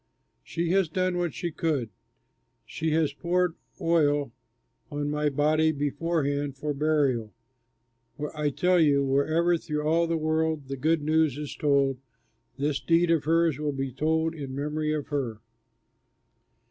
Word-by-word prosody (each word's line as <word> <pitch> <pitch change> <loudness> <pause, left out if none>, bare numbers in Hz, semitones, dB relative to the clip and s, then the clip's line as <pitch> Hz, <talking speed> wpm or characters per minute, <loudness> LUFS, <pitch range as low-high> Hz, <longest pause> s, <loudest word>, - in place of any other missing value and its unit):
She 170 - -2
has 190 -3 +2
done 185 +1 0
what 175 -2 0
she 170 +5 -3
could; 145 -9 -1 0.7
she 160 0 -3
has 155 -3 +1
poured 175 +2 0 0.3
oil 145 -5 +2 0.6
on 145 0 -2
my 150 0 +1
body 155 +3 +2
beforehand 145 -1 -1
for 150 +1 -2
burial. 140 -8 0 1.0
I 150 -1 0
tell 180 +5 +2
you, 140 -3 +4
wherever 155 +6 +2
through 150 -2 -3
all 165 +2 +2
the 165 0 0
world 155 -2 -1
the 135 - -2
good 155 +3 +1
news 155 -2 +2
is 150 -1 -5
told, 140 -3 +2 0.6
this 145 +1 0
deed 170 0 +2
of 160 -3 +2
hers 165 -2 +2
will 150 -1 -1
be 135 -1 -3
told 160 +4 0
in 140 -4 -6
memory 150 +2 -2
of 150 -2 -3
her." 130 -7 -2
150 Hz, 145 wpm, -27 LUFS, 140-165 Hz, 1.0 s, you